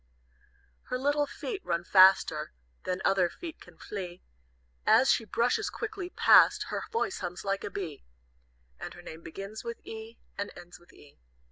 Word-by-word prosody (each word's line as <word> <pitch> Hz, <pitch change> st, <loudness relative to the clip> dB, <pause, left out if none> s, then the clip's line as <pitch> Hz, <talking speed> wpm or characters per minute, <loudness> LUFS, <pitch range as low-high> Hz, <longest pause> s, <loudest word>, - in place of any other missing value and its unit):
"Her 250 Hz, -, -2 dB
little 290 Hz, +2 st, +1 dB
feet 405 Hz, +6 st, -6 dB
run 170 Hz, 0 st, -1 dB
faster 190 Hz, -, +5 dB, 0.3 s
Than 185 Hz, +1 st, -2 dB
other 185 Hz, -3 st, +3 dB
feet 335 Hz, -, -9 dB
can 175 Hz, -2 st, -16 dB
flee, 180 Hz, -3 st, -7 dB, 0.6 s
As 230 Hz, +5 st, +5 dB
she 225 Hz, -, +1 dB
brushes 245 Hz, -, +1 dB
quickly 420 Hz, -5 st, -5 dB
past, -, -, +6 dB
her -, -, -2 dB
Voice 450 Hz, -3 st, -1 dB
hums 180 Hz, +1 st, -5 dB
like 195 Hz, 0 st, -1 dB
a -, -, -3 dB
bee, 175 Hz, -8 st, -6 dB, 0.8 s
And -, -, -7 dB
her -, -, -12 dB
name 160 Hz, +1 st, -9 dB
begins 195 Hz, +6 st, -8 dB
with 235 Hz, 0 st, -5 dB
E, 225 Hz, +1 st, -8 dB, 0.2 s
and 200 Hz, -, -3 dB
ends 175 Hz, 0 st, -12 dB
with 175 Hz, -, -21 dB
E. 145 Hz, -, -19 dB
200 Hz, 160 wpm, -29 LUFS, 180-260 Hz, 0.8 s, past